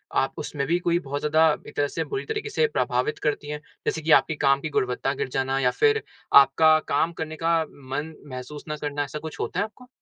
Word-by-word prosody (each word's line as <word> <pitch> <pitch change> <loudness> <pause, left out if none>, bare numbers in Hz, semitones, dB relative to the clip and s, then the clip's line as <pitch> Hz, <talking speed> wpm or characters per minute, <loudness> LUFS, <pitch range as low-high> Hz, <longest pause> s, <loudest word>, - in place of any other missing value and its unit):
आप - - +1
उसमें 140 -2 -3
भी 170 - +2
कोई 175 -1 +1
बहुत 145 -3 -4
ज़्यादा 155 +2 +4 0.2
एक - - -11
तरह 145 - +1
से - - -3
बुरी 410 -1 -4
तरीक़े 435 0 -3
से 460 +2 +2
प्रभावित 135 - -1
करती 150 -1 -1
हैं? 150 0 -4 0.3
जैसे 160 - -1
कि 160 +1 0
आपकी 155 - +5
काम 140 -1 +3
की 155 - -3
गुणवत्ता 130 -1 0
गिर 130 - -3
जाना 135 +1 0
या 125 -2 +3
फिर 440 - +2 0.3
आपका 155 +3 +7
काम 160 +4 +1
करने 160 -1 -5
का 165 +1 +2
मन 145 +2 -6 0.2
महसूस 130 +3 -7
ना 150 - -3
करना, 145 -1 -2
ऐसा 145 +2 -6
कुछ 160 0 -8
होता 180 - -2
है - - +3
आपको? 250 +4 -15
150 Hz, 230 wpm, -25 LUFS, 140-165 Hz, 0.3 s, आपका